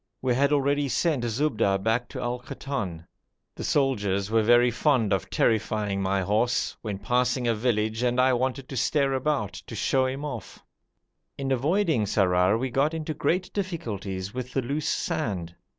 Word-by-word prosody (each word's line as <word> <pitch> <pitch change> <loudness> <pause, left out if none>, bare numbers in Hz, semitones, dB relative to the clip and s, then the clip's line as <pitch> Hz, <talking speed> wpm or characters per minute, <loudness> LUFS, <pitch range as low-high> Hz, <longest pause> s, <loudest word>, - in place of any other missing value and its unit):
We 130 -2 +1
had 140 +3 +2
already 145 0 +2
sent 150 -3 +1
Zubda 115 -5 +1
back 115 +4 0
to - - -6
Al 120 +1 -2
Koton. 105 -10 -5 0.5
The - - -7
soldiers 105 -8 0
were 115 0 +4
very 120 +2 +5
fond 125 -5 +2
of 95 - -1
terrifying 105 -3 0
my 95 0 +1
horse, 110 +6 +1
when 105 -3 -4
passing 125 +4 0
a 115 - +3
village 110 -1 0
and 125 0 +1
I 130 0 +4
wanted 130 +2 -1
to 135 - -6
stare 135 +2 +2
about, 130 -7 -1
to 115 - -9
show 130 +5 +2
him 135 +3 -4
off. 125 -8 -7 0.7
In 135 -1 -2
avoiding 150 - +2
Sarrar 95 0 +3
we 130 +2 -2
got 145 +6 +1
into 155 -1 -3
great 175 +6 -1
difficulties 105 - -4
with 125 0 -5
the 135 - 0
loose 140 +5 -2
sand. 90 -6 -2
120 Hz, 165 wpm, -26 LUFS, 105-135 Hz, 0.7 s, very